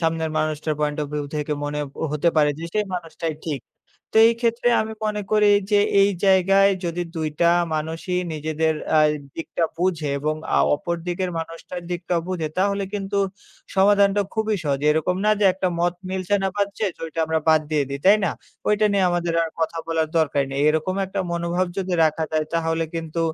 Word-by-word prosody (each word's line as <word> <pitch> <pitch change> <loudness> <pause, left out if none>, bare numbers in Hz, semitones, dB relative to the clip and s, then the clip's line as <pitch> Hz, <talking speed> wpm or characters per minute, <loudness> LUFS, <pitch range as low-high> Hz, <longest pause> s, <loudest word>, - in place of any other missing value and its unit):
সামনের 160 -1 0
মানুষটার 155 0 -1
point 150 0 -1
of - - -3
view 150 -1 -2
থেকে 150 0 -2
মনে 145 0 -3 0.3
হতে 150 +3 +2
পারে 150 -1 +4
যে 165 - -6
সেই 210 -1 +2
মানুষটাই 165 -2 -4
ঠিক। 145 -5 -2 0.5
তো - - +3
এইক্ষেত্রে 235 +1 0
আমি 220 0 -5
মনে 210 -1 -1
করি 210 -1 +4 0.2
যে 205 - +5 0.2
এই 200 - +5 0.2
জায়গায় 195 +1 +5 0.2
যদি 170 +1 -2
২ 160 -1 -1
টা - - +5 0.3
মানুষই 165 +4 -3 0.2
নিজেদের 155 +1 0 0.2
আ - - +6 0.4
দিকটা 165 +1 -3
বুঝে 170 -4 0
এবং 155 +1 -1 0.2
আ - - +4 0.2
অপরদিকের 175 +3 -3
মানুষটার 165 +2 -7
দিকটা 175 0 -2
বুঝে 175 -4 -2
তাহলে 200 +1 +1
কিন্তু 200 0 -2 0.6
সমাধানটা 200 +1 +4
খুবই 220 -1 0
সহজ। 140 -2 0
এরকম 160 +4 0
না - - +4
যে 205 - +3
একটা 190 0 -1
মত 175 0 +2 0.2
মিলছে 190 +1 0
না - - +2
পাচ্ছে 200 +1 -1 0.2
ঐটা 165 0 -5
আমরা 160 0 0
বাদ 155 -1 +5
দিয়ে 150 -2 +2
দেই। 140 0 -4
তাই 200 +2 +8
না? 170 - 0 0.4
ঐটা 210 0 +3
নিয়ে 200 -1 +2
আমাদের 175 -1 -1
আর 165 - -3
কথা 165 +1 -1
বলার 160 -1 0
দরকার 145 -3 +2
নেই। 135 - -2
এরকম 160 +5 0
একটা 190 - -4
মনোভাব 170 +2 0
যদি 185 -1 -1
রাখা 160 0 +1
যায় 155 -1 0
তাহলে 165 0 0
কিন্তু 165 0 -4
170 Hz, 185 wpm, -23 LUFS, 155-195 Hz, 0.6 s, তাই